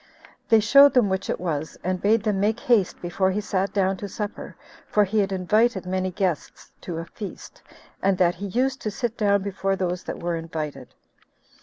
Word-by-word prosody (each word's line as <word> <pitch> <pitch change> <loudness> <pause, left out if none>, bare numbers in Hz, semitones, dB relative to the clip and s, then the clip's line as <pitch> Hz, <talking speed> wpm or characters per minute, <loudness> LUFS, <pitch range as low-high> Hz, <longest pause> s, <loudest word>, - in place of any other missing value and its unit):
They 225 -1 +6
showed 275 +7 +6
them 240 -6 +4
which 190 0 -2
it - - -1
was; 160 -3 -3
and 185 0 -1
bid 220 +2 +3
them 210 -3 0
make 215 +3 +1
haste 220 -7 +2
before 185 +2 +1
he 190 +2 -1
sat 200 -2 -1
down 195 -1 +1
to 200 +1 -6
supper, 210 +1 -6 0.3
for 210 - +3
he 210 +2 0
had 195 -1 +1
invited 195 +3 +1
many 185 0 -1
guests 185 -3 -3
to 170 -3 -5
a 165 - -4
feast, 200 +3 -9 0.4
and 195 -1 +2
that 175 -2 +3
he 200 +4 -6
used 260 +6 0
to 215 - -2
sit 230 +2 -3
down 200 -3 +2
before 195 0 -1
those 180 -2 -2
that - - -5
were 170 -1 -2
invited. 155 -5 -6
195 Hz, 195 wpm, -24 LUFS, 180-210 Hz, 0.4 s, They